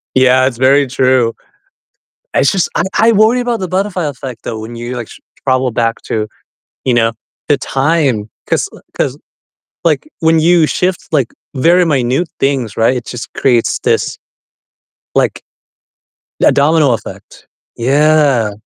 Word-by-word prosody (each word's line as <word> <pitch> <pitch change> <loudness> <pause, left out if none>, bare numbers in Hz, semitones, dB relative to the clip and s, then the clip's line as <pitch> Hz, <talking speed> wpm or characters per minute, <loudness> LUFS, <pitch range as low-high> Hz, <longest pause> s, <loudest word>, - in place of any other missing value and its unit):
Yeah, 130 0 +4
it's 120 -3 -4
very 135 +2 +4
true. 130 -2 +2 1.0
I - - +3
just 180 +6 +2
I - - +1 0.2
I 230 +1 +5
worry 220 +4 +4
about 240 -3 -1
the 185 - -3
butterfly 185 0 -1
effect 130 -4 -7
though 110 - -4
when 115 +2 -8
you, 120 +2 -5
like, 120 -3 -6
s - - -13 0.3
travel 130 -1 +2
back 115 0 -1
to, 110 -1 -2 0.6
you 130 - +2
know, 115 -1 +2 0.4
the 145 - +3
time. 135 -7 0 0.2
'Cause - - 0
l - - -14 0.2
'cause, - - -1 0.7
like, 165 - +1
when 160 0 +3
you 170 0 +4
shift, 180 +3 0
like, 135 -6 +1 0.2
very 175 +6 +4
minute 135 +2 0
things, 135 -6 0
right, 115 +3 +2
it 120 - -4
just 120 -1 -6
creates 120 -4 +1
this, - - +1 1.0
like - - +1 1.0
a - - +6
domino 150 -1 +3
effect. 115 - -7 0.3
Yeah. 140 -3 +2
135 Hz, 150 wpm, -14 LUFS, 120-165 Hz, 1.0 s, a